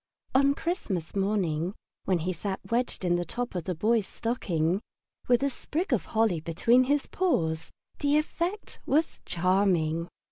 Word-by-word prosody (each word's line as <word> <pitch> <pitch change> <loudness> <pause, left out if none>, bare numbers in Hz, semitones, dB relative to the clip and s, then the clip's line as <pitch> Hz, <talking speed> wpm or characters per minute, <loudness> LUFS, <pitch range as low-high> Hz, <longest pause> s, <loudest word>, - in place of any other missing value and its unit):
On 275 +1 +4
Christmas 205 - -3
morning, 190 -3 0 0.3
when 185 - +2
he 185 - 0
sat 190 +3 -3
wedged 235 -5 0
in 175 0 +3
the 175 - -1
top 240 +8 -3
of 175 -3 -3
the 180 - -2
Boy's 215 +4 +2
stocking, 185 -6 -1 0.5
with 245 +2 +4
a 280 - +3
sprig 315 +4 -2
of 235 - +1
holly 220 -6 +2
between 230 +11 +3
his 285 +1 +1
paws, 165 - 0 0.3
the 290 0 +3
effect 340 +6 -2
was 310 +3 +1
charming. 175 -3 +2
200 Hz, 150 wpm, -28 LUFS, 175-260 Hz, 0.5 s, On